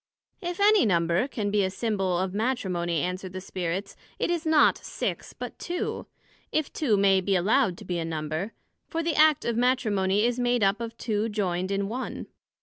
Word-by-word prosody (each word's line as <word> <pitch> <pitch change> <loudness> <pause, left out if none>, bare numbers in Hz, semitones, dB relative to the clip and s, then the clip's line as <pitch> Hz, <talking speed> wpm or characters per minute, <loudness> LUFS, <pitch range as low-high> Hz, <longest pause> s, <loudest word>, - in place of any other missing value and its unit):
If 350 +1 -4
any 415 -2 +6
number 170 +1 +2
can 210 -7 -3
be 205 -1 +3
a 190 - +1
symbole 195 -3 -1
of 190 -1 -4
Matrimony, 185 - -1
answered 180 +1 -4
the 185 - -4
Spirits, 185 +1 -4 0.2
it - - 0
is 335 -1 -1
not 315 -1 +5
Six, - - -4
but - - -8
Two; 350 +1 -3 0.4
if 310 -2 -1
two 235 -10 +2
may 195 -1 +4
be 195 +1 +1
allowed 195 +1 +2
to 210 - -11
be 180 -1 -2
a - - -1
Number: 160 +5 -3 0.3
for 330 0 -2
the 330 0 0
act 310 -1 +4
of 235 - 0
Matrimony 215 -5 +2
is 245 +1 0
made 245 -2 +2
up 195 +3 +2
of 230 0 -5
two 220 0 -1
joined 185 -3 -1
in 200 0 -1
one. 250 +5 -4
205 Hz, 190 wpm, -27 LUFS, 185-245 Hz, 0.4 s, any